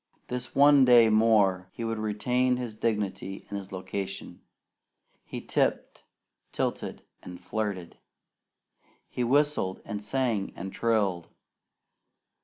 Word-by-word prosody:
This 125 0 -4
one 140 0 +7
day 120 -3 +7
more 105 -4 +3
he 115 - -6
would 115 -1 -2
retain 125 +4 +1
his 120 -3 -5
dignity 105 -3 -3
and 100 - -3
his 95 -1 -11
location. 95 +1 -6 0.8
He - - -6
tipped, - - -1 0.5
tilted, - - -3 0.2
and 90 -1 -10
flirted. 95 -2 -4 1.1
He 125 - -2
whistled, 140 -7 +1
and 105 -2 -5
sang, 115 -3 -1
and 95 +2 -7
trilled. 100 -7 0
110 Hz, 110 wpm, -28 LUFS, 95-120 Hz, 1.1 s, one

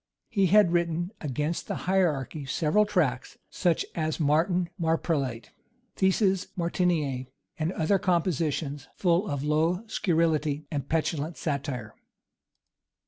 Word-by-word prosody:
He 195 -4 +2
had 200 -1 +5
written 170 +1 0
against 150 +3 -2
the - - -4
hierarchy 155 -6 0
several 170 +10 +2
tracts, 155 -11 0
such 175 -3 +1
as 155 -1 -2
Martin 170 +4 +2
Marprelate, 155 -7 -1 0.4
Theses 190 0 +2
Martinianæ, 165 -7 0 0.3
and 160 +2 0
other 190 +5 +2
compositions, 160 -5 0
full 180 +2 +2
of 145 -3 -2
low 160 +6 +1
scurrility 160 -7 0
and 145 -3 -3
petulant 160 0 -1
satire. 135 -7 -3
165 Hz, 110 wpm, -27 LUFS, 145-180 Hz, 0.4 s, had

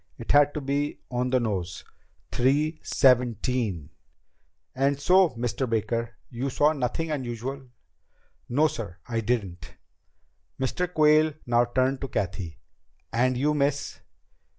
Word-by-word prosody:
It - - -4
had 145 0 +5
to 150 - -2
be 140 +2 -2
on 125 +1 -1
the 130 0 +3
nose. 95 -7 -3 0.5
Three 150 +5 +1
seventeen! 120 - +1 0.8
"And 140 +1 +1
so, 180 +4 +5
Mr. 120 +2 -2
Baker, 115 +1 -1 0.2
you 130 +3 -3
saw 150 +4 +3
nothing 150 +4 -2
unusual?" 130 0 -4 0.8
"No, 150 +6 +3
sir, 105 - -6
I 115 -1 -1
didn't." 100 -7 -3 0.8
Mr. 175 +7 -1
Quayle 155 -1 +4
now 120 0 +3
turned 130 +2 0
to 135 - -3
Cathy. 95 - -3 0.6
"And 125 +2 +2
you, 150 +4 +2
miss?" 145 -1 -1
130 Hz, 125 wpm, -26 LUFS, 115-145 Hz, 0.8 s, had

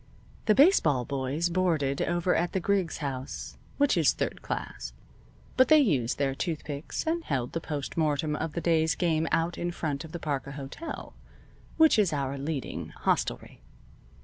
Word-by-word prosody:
The 215 - +5
baseball 160 - +5
boys 140 +4 -1
boarded 165 -6 +1
over 175 +1 +1
at 175 +1 0
the 190 - +1
Griggs 180 -5 0
House, 130 -1 -5 0.2
which 285 0 +3
is - - +4
third - - -3
class, - - -5 0.6
but 260 - +6
they 310 - +7
used 145 - +2
their 140 -1 +1
tooth 160 +2 -3
picks, 145 0 -4
and 330 +1 0
held 125 - -2
the 165 - -2
postmortem 150 0 -1
of 155 0 -3
the 170 - -2
day's 160 -2 +2
game 160 -2 +1
out 165 +1 0
in 175 - -1
front 155 -4 -3
of 160 - -10
the 170 - -4
Parker 140 -3 -3
Hotel, 140 - -7 0.6
which 320 -7 +6
is 200 -5 +3
our 140 -2 -1
leading 140 -1 -4
hostelry. - - -1
160 Hz, 165 wpm, -28 LUFS, 140-175 Hz, 0.6 s, they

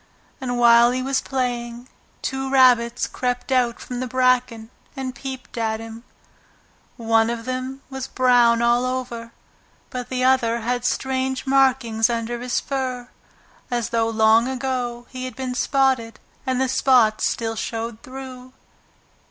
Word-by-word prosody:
And 245 -2 -2
while 235 0 +6
he 255 +1 -1
was 270 0 0
playing, 245 -2 -3 0.4
two 265 0 -2
rabbits 245 -3 +4
crept 250 +1 -3
out 245 -2 +2
from 250 -1 -6
the 255 - -3
bracken 250 -3 +1 0.2
and 265 -2 -4
peeped 260 -1 -7
at 220 -1 -1
him. 225 +1 -9 0.9
One 225 -1 +2
of 235 -1 -4
them 255 +1 -4
was 265 -1 -5
brown 240 -2 +3
all 240 +1 +3
over, 250 -2 -4 0.6
but 250 -1 -5
the 255 -1 -1
other 240 -3 +2
had 245 +2 -2
strange 265 0 -1
markings 260 -4 +2
under 235 0 -2
his 250 0 -1
fur, 255 -3 -4 0.6
as 240 -3 -1
though 225 -1 +1
long 220 +1 +4
ago 250 -2 -3
he 255 -1 -5
had 255 - -7
been 260 -1 -4
spotted, 255 -3 +1 0.3
and 255 -1 0
the 265 - +2
spots 240 -5 +3
still 225 -1 -2
showed 225 0 -4
through. 255 -1 -10
245 Hz, 145 wpm, -22 LUFS, 235-260 Hz, 0.9 s, while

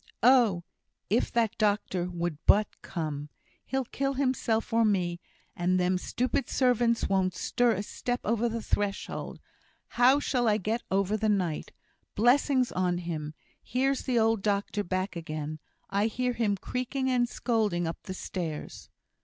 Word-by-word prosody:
"Oh! 235 -8 +5 0.5
if 230 - +2
that 230 -3 +1
doctor 200 -4 +1
would 175 -3 -3
but 210 0 +6
come! 150 -4 -4 0.4
He'll 265 -1 -1
kill 275 +3 -2
himself 255 -5 0
or 230 0 +4
me 180 -5 +1 0.4
and 180 +1 +1
them 180 0 +1
stupid 250 +7 -1
servants 240 -3 +2
won't 190 -2 +1
stir 240 -1 +2
a 205 - -2
step 245 +3 -3
over 230 +2 +1
the 230 -1 -4
threshold; 205 -1 -2 0.5
how 255 +4 +5
shall 250 -4 0
I 210 -1 +4
get 220 +4 -1
over 195 +2 +1
the 215 0 0
night? 180 -7 -1 0.4
Blessings 255 +3 +3
on 180 -1 0
him 155 -3 -5 0.3
here's 270 +2 0
the 255 -3 +1
old 225 -2 +3
doctor 205 0 0
back 185 0 -2
again! 155 -2 -5 0.3
I 200 +2 +2
hear 250 +2 -1
him 215 -4 0
creaking 260 +5 -2
and 240 -1 +2
scolding 215 -9 0
up 165 - -4
the 190 -2 -7
stairs!" 165 -5 -5
210 Hz, 150 wpm, -28 LUFS, 180-240 Hz, 0.5 s, but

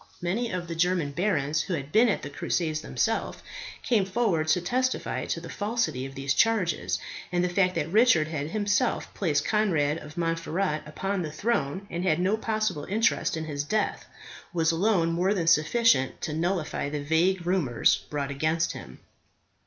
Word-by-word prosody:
Many 205 +7 -1
of 180 -2 -3
the 165 - -4
German 170 -3 +1
barons 155 -3 0
who 185 - -2
had 140 -2 -6
been 230 +5 +5
at - - -1
the 145 - -5
crusades 155 +1 -1
themselves - - -1 0.5
came 225 -5 +2
forward 190 -5 0
to 155 +3 +3
testify 255 +9 -1
to - - -2
the - - -9
falsity 210 - -2
of 135 - -12
these 140 0 0
charges, 175 - +1 0.3
and 175 0 +1
the 180 - +1
fact 180 0 +2
that 150 - -1
Richard 210 -8 +5
had 150 -2 -3
himself 205 +5 0
placed 150 -7 0
Conrad 165 -8 +1
of 150 +1 -12
Montferat 165 0 -1
upon 195 +5 -2
the 155 -3 -4
throne, 195 -3 -1
and 170 +1 -3
had 175 -3 +2
no 190 +4 +2
possible 215 -8 -1
interest 215 -4 +1
in 160 - -4
his 145 -2 -3
death, 215 +8 -1 0.5
was 165 -1 +2
alone 170 -1 +2
more 180 +5 +1
than 175 -4 -1
sufficient 165 - +3
to 155 - -3
nullify 165 -3 -1
the 145 -1 -4
vague 170 +4 +2
rumours 150 - +2
brought 140 -1 -2
against 155 +4 0
him. - - -10
170 Hz, 175 wpm, -27 LUFS, 150-200 Hz, 0.5 s, been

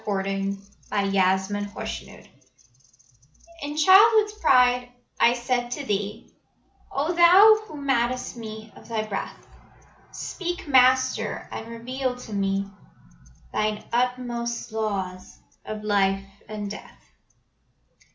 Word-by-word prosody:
Sarojini 195 -1 -2 0.3
Naidu 200 -1 0
The 190 -1 +4
Soul's 205 +1 -5
Prayer - - -15 1.4
In 290 +1 -5
childhood's 420 +6 +6
pride 250 -1 +4 0.3
I 235 - +5
said 245 0 -1
to 285 - -6
Thee: 205 0 -3 0.6
"O 300 +5 -1
Thou, 375 +6 +7
who 300 - -9
mad'st 255 -3 -1
me 220 -2 -9
of - - -15
Thy 225 -2 -2
breath, 200 -2 -6 0.7
Speak, 350 -3 -5
Master, 260 -1 +3
and 225 - -6
reveal 250 +3 -4
to 250 -3 -10
me 195 0 0 0.9
Thine 215 0 -1
inmost 240 -1 -2
laws 195 -4 -4 0.3
of 215 0 -6
life 195 -2 +1 0.2
and 210 -2 -5
death. - - -11
235 Hz, 110 wpm, -25 LUFS, 205-260 Hz, 1.4 s, Thou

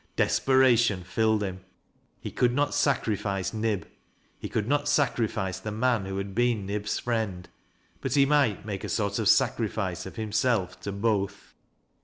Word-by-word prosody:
Desperation 120 -7 +3
filled 110 +3 +1
him. 95 -2 -4 0.6
He - - -6
could 125 -1 +1
not 145 +1 +1
sacrifice 105 - 0
Nib 110 -5 -1 0.3
— - - -38
^he - - -5
could 105 -1 -1
not 145 +2 +1
sacrifice 115 - 0
the 110 - -5
man 115 -1 +1
who 95 0 -4
had 100 0 -4
been 120 -2 +1
Nib'fl 105 +1 -2
friend; 110 -7 -2 0.5
but 135 0 -1
ho 140 -1 +5
might 140 -9 +2
make 100 -3 -5
a - - -4
sort 100 -1 -1
of 110 - +2
sacrifice 105 -8 +1
of - - -10
himself 110 -2 0
to 100 - -4
both. 100 -1 -2
110 Hz, 160 wpm, -27 LUFS, 100-120 Hz, 0.6 s, ho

